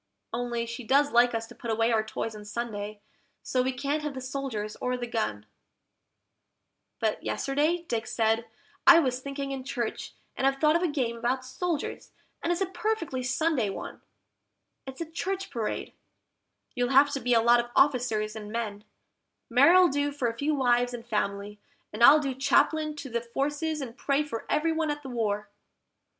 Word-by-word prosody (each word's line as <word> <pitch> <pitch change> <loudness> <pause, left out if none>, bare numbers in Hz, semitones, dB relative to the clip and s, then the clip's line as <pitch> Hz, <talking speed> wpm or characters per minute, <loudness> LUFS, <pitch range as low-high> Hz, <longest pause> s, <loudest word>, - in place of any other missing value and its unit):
Only 235 0 -2
she 235 +2 -6
does 280 +5 +3
like 240 0 +4
us 225 0 -2
to 235 - -13
put 235 - -8
away 225 +1 +2
our 220 -1 +2
toys 220 0 -4
on 210 - -9
Sunday, 210 -1 -5 0.4
so 255 - +1
we 260 +1 0
can't 280 +4 -2
have 300 -2 -4
the - - -4
soldiers 255 -5 -4
or 250 0 -1
the 245 - -3
gun; 215 - -2 1.5
But 220 -1 -1
yesterday 305 +5 0
Dick 225 -1 -2
said, 225 0 +1 0.4
"I 345 -1 +10
was 255 -6 +2
thinking 275 +1 -5
in 265 -1 -4
church, 245 -4 -4 0.2
and 265 - +1
I've 270 - +2
thought 305 +2 +3
of 340 - +2
a 360 - +2
game 255 -7 -1
about 255 +2 -1
soldiers, 330 +3 -3 0.3
and 340 - 0
it's 350 +2 -1
a - - +3
perfectly 355 -7 -2
Sunday 265 -2 +1
one; 195 - -7 0.9
It's 265 +4 -8
a - - -1
Church 385 +3 -3
Parade: 230 -5 -3 0.8
you'll 245 -1 0
have 275 +2 +5
to 280 - -2
be 245 -1 +2
a - - +6
lot 240 +1 +6
of 240 0 -2
officers 240 -6 +2
and 210 -1 -7
men, 215 -2 -4 0.7
Mary'll 335 +9 +7
do 285 -1 0
for 280 -4 -1
a 230 - -2
few 295 +5 0
wives 245 -2 +2
and 235 -1 -9
families, 210 -2 -2 0.3
and 220 +3 0
I'll 295 +5 +9
be 275 -3 -2
Chaplain 305 +3 +2
to 285 -2 -7
the 235 0 -1
Forces 290 +6 -2
and 240 -3 -6
pray 280 +2 +1
for 255 -7 -6
everyone 320 0 +1
at 295 0 -3
the 265 - -7
war." 210 -4 -2
255 Hz, 185 wpm, -28 LUFS, 230-290 Hz, 1.5 s, I